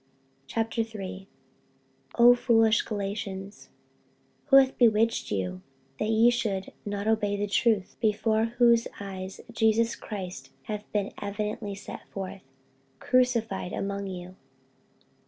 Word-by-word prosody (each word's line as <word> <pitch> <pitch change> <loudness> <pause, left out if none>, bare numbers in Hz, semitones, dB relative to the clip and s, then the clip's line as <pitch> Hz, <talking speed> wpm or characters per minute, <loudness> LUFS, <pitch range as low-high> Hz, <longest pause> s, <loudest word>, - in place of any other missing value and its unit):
48:003:001 220 -4 -3 0.9
O 240 +1 +8
foolish 225 -2 +3
Galatians, 200 -1 -5 0.8
who 280 - +5
hath 270 -1 +6
bewitched 225 -1 +3
you, 90 -2 -2 0.4
that 215 - 0
ye 225 +2 +5
should 200 -5 -2 0.2
not 205 0 -3
obey 210 -2 +1
the 205 - 0
truth, 205 0 +1
before 220 0 +2
whose 235 0 +3
eyes 190 -1 -7
Jesus 225 +1 +2
Christ 190 -4 -7
hath 210 -1 -6
been 205 -1 -1
evidently 205 0 -3
set 200 - -10
forth, 195 0 -6 0.6
crucified 230 -7 +1
among 200 0 -3
you? 185 -1 -7
210 Hz, 110 wpm, -27 LUFS, 195-230 Hz, 0.9 s, O